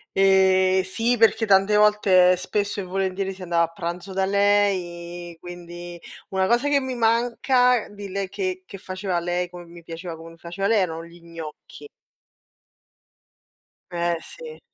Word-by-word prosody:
Ehm, 190 -1 +4
sì, 225 +6 0
perché 225 0 +4
tante 195 0 +4
volte, 195 -4 +5
spesso 205 +3 -2
e - - -3
volentieri, 190 +1 -2
si 190 -1 -10
andava 170 -1 +2
a - - -9
pranzo 175 +2 -5
da 190 0 0
lei, 180 -4 0
quindi 175 0 -9 0.3
una 190 -1 0
cosa 240 +6 +2
che 290 -1 +3
mi 260 -1 -4
manca 245 +1 +2
di 205 -1 -9
lei 195 0 -3
che 370 - -4
che 195 - -10
faceva 185 -1 -3
lei, 175 +1 -2
come 175 -1 -10
mi 170 0 -14
piaceva 165 +1 -7
come 165 +1 -11
li 165 - -16
faceva 175 +4 -3
lei, 225 0 +3
erano 165 -2 -3
gli 170 +1 -16
gnocchi. 165 - -10 2.0
Eh 170 -1 0
sì. 475 -1 -10
190 Hz, 155 wpm, -23 LUFS, 175-205 Hz, 2.0 s, volte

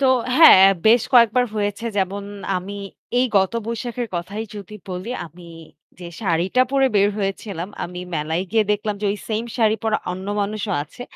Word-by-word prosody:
তো 270 - +3 0.3
হ্যাঁ 315 - +9 0.2
বেশ 230 +1 +6
কয়েকবার 240 +1 +5
হয়েছে 205 +1 -2
যেমন 195 +1 -1 0.3
আমি 185 +2 -6 0.5
এই 255 - +3
গত 190 +1 +3
বৈশাখের 235 +1 -4
কথাই 200 +6 -4
যদি 205 0 -9
বলি 185 +3 -5 0.2
আমি 170 +3 -16 0.6
যে 180 - -8
শাড়িটা 185 +5 +1
পরে 270 -1 +3
বের 200 0 +4
হয়েছিলাম 195 -2 -4 0.2
আমি 180 +1 -7
মেলায় 160 +3 -1
গিয়ে 220 0 +3
দেখলাম 210 0 -2
যে 210 - -1
ওই - - -5
সেইম 220 +1 -1
শাড়ি 220 -2 +3
পরা 220 -1 +1
অন্য 185 +1 -7
মানুষও 205 0 -2
আছে। 155 +11 -11
205 Hz, 165 wpm, -21 LUFS, 185-225 Hz, 0.6 s, হ্যাঁ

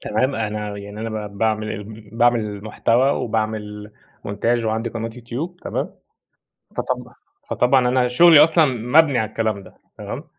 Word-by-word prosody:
تمام 130 +6 0
أنا 105 -1 -3
يعني 100 +1 -8
أنا 110 -2 -4
ب 100 -1 -12
باعمل 110 -1 -1 0.3
باعمل 115 -3 +1
محتوى 120 +5 +2
وباعمل 110 -3 -3 0.3
مونتاچ 115 +3 0
وعندي 110 +1 -1
قناة 115 0 -4
YouTube 125 +10 -7
تمام، - - -3 0.9
فطب - - -3 0.4
فطبعًا 125 0 +3
أنا 125 0 +2
شغلي 155 +4 +7
أصلًا 160 0 +4
مبني 130 +3 +3
على 110 - 0
الكلام 110 -2 -2
ده - - -16 0.2
تمام، - - -6
115 Hz, 140 wpm, -21 LUFS, 105-125 Hz, 0.9 s, شغلي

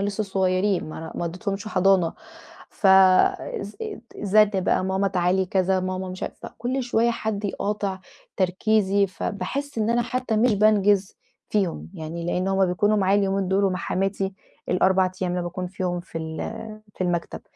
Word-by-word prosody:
لسه 205 +1 -1
صغيرين 190 -2 0
ما 155 - -7
أنا 160 0 -7
ما - - -3
ودّيتهمش 195 +5 -4
حضانة، 185 -3 +3 0.6
ف 200 - -1
الز 190 +1 +4 0.4
زَنّ 210 +1 +4
بقى 185 -1 +1
"ماما 190 +1 +1
تعالي 185 +1 +1
كذا، 190 0 +1
ماما 185 0 -3
مش 185 0 -7
عارفه" - - -6
فكُلّ 255 +3 -3
شوية 235 -1 +2
حد 220 -3 -3
يقاطع 200 -1 -2 0.4
تركيزي، 200 +1 +2
فباحس 270 +8 -4
إن 220 +1 +1
أنا 240 0 +2
حتى 245 -2 -2
مش 225 0 +3
بانجِز 205 -2 +3 0.3
فيهم، 195 -5 -1
يعني 170 0 -6
لأن 180 +2 0
هم 195 0 +3
بيكونوا 205 +4 +2
معايا 195 0 +3
اليومين 195 -1 0
دول 195 +1 +2
ومع 185 -1 +1
حماتي 195 +2 -1 0.4
ال4 185 +1 +3
أيام 180 - 0
اللي 180 0 -1
باكون 180 +1 -4
فيهم 180 -1 -3
في 175 -2 -7
ال 160 +7 -6
في 185 - -2
المكتب، 175 -1 -2
190 Hz, 160 wpm, -24 LUFS, 185-205 Hz, 0.6 s, الز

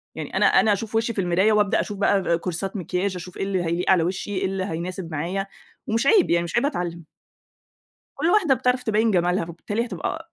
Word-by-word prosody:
يعني - - -6
أنا - - +4
أنا 215 - +4
أشوف 220 +2 -4
وشي 230 +1 +1
في 200 - -1
المراية، 185 +4 +2
وابدأ 210 -1 +2
اشوف 205 - -3
بقى 195 -4 +2
كورسات 185 +4 -4
مكياچ، 185 +2 -2
أشوف 180 +1 -8
إيه - - -2
اللي 190 -2 -1
هيليق 170 +2 0
على 180 -3 +4
وشي، 180 +4 -3
إيه 185 - 0
اللي 190 0 -2
هيناسب 175 0 -5
معايا، 175 +6 -2 0.4
ومش 230 +5 0
عيب 400 -1 +5
يعني 170 0 +3
مش 170 - -5
عيب 235 - +2
اتعلّم. 175 - -3 1.1
كل 290 +3 -1
واحدة 355 -9 +4
بتعرف 250 0 0
تبيّن 220 0 +2
جمالها، 180 -1 +1
فبالتالي 205 +7 -4
هتبقى 315 - -5
195 Hz, 205 wpm, -23 LUFS, 175-220 Hz, 1.1 s, عيب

